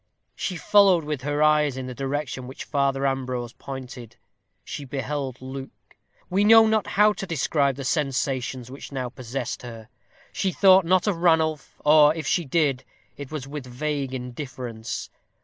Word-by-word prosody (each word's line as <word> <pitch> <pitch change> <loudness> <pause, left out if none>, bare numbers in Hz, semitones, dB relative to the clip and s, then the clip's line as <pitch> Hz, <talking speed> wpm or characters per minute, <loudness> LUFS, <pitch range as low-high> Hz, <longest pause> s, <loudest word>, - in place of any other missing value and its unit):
She 185 - -3
followed 190 -1 +5
with 150 -3 -4
her 145 +2 0
eyes 150 -3 +3
in 130 - -4
the 125 - -6
direction 135 -1 -4
which 130 - -8
Father 140 -1 0
Ambrose 130 -3 -2
pointed. 125 -4 -9 0.5
She 145 - -6
beheld 135 -1 -4
Luke. 135 +1 -6 0.6
We 195 +3 +1
know 225 +1 +8
not 220 -1 +1
how 210 +1 +6
to 195 - -6
describe 140 -3 +1
the 135 - -6
sensations 130 -3 -1
which 140 - -9
now 130 -2 -3
possessed 130 +1 -5
her. 115 -2 -10 0.4
She 190 - 0
thought 190 -1 +6
not 185 +2 +3
of 205 -5 0
Ranulph; 160 -3 +1
or, 150 0 +6
if 160 -2 -5
she 175 +3 +1
did, 140 -3 +1 0.3
it 145 -2 -8
was 145 -4 -5
with 140 -2 -7
vague 135 +1 -3
indifference. 125 -3 -6
140 Hz, 160 wpm, -24 LUFS, 130-155 Hz, 0.6 s, know